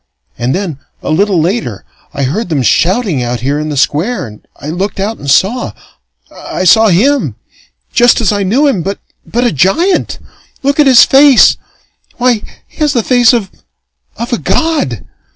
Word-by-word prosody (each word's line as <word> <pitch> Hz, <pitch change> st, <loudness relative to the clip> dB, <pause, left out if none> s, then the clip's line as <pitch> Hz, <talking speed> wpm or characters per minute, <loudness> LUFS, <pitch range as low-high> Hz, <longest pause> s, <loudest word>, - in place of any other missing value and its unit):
And 125 Hz, +2 st, -2 dB
then, 180 Hz, -8 st, -4 dB, 0.2 s
a -, -, -3 dB
little 190 Hz, +2 st, +1 dB
later, 165 Hz, -, -2 dB, 0.3 s
I 140 Hz, -, -4 dB
heard 175 Hz, -, -2 dB
them 145 Hz, -5 st, -1 dB
shouting 180 Hz, -, +1 dB
out 120 Hz, 0 st, -3 dB
here 140 Hz, +3 st, -1 dB
in 155 Hz, 0 st, -4 dB
the 145 Hz, -, -4 dB
Square, 155 Hz, -, 0 dB
and 105 Hz, -2 st, -14 dB
I 145 Hz, -, -7 dB
looked 190 Hz, +5 st, -3 dB
out 210 Hz, +3 st, -3 dB
and 140 Hz, -, -6 dB
saw. 205 Hz, -, +1 dB, 0.6 s
I -, -, -5 dB
saw 220 Hz, +5 st, +5 dB
him 255 Hz, +10 st, +1 dB, 0.6 s
just 240 Hz, -1 st, +4 dB
as 225 Hz, -5 st, +1 dB
I 205 Hz, -1 st, -1 dB
knew 230 Hz, +10 st, +1 dB
him 265 Hz, -11 st, +1 dB
but 195 Hz, +4 st, -4 dB, 0.4 s
a 240 Hz, 0 st, +2 dB
giant! 195 Hz, -, 0 dB, 0.5 s
Look 280 Hz, +2 st, 0 dB
at 295 Hz, -, +4 dB
his 255 Hz, -3 st, +7 dB
face! 275 Hz, -1 st, +5 dB, 0.6 s
Why, 245 Hz, -3 st, +1 dB, 0.3 s
he -, -, -26 dB
has 300 Hz, -3 st, 0 dB
the 235 Hz, -, 0 dB
face 245 Hz, -1 st, +4 dB
of 225 Hz, -6 st, -2 dB, 0.7 s
of 235 Hz, +3 st, -4 dB
a 235 Hz, -, 0 dB
god! 310 Hz, -, -1 dB
200 Hz, 170 wpm, -12 LUFS, 155-245 Hz, 0.7 s, his